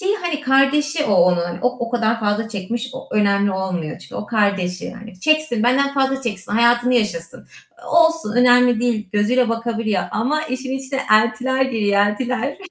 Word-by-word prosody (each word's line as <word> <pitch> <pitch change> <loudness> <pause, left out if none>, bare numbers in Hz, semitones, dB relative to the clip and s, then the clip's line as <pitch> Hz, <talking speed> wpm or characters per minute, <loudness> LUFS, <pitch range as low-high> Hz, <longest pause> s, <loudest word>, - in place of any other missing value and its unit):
şeyi, 400 +2 0
hani, 345 -7 -3
kardeşi 290 +3 +2
o 205 - +1
onun, 175 -1 +2
o 250 - +4 0.2
o - - -8
kadar 230 -1 0
fazla 210 +1 -1
çekmiş, 230 +4 -4
o 265 - -9
önemli 200 -1 +2
olmuyor 185 -5 -4
çünkü - - -12
o - - -5
kardeşi 200 -5 -1
yani. 210 -4 -10
Çeksin, 310 -4 +1
benden 275 +4 +2
fazla 270 -1 0
çeksin, 205 -5 -4
hayatını 240 +2 +3
yaşasın. 170 -8 -2 0.4
E, - - -14
olsun, 325 -8 +2
önemli 245 -1 +4
değil, 230 -4 -1
gözüyle 230 +4 +2
bakabiliyor 230 -4 -2
ama 280 +8 -1
işin 260 -3 -4
içine 265 0 -4
eltiler 235 +5 +2
giriyor, 225 -6 -1
eltiler. 250 +5 -3
235 Hz, 165 wpm, -19 LUFS, 205-265 Hz, 0.4 s, o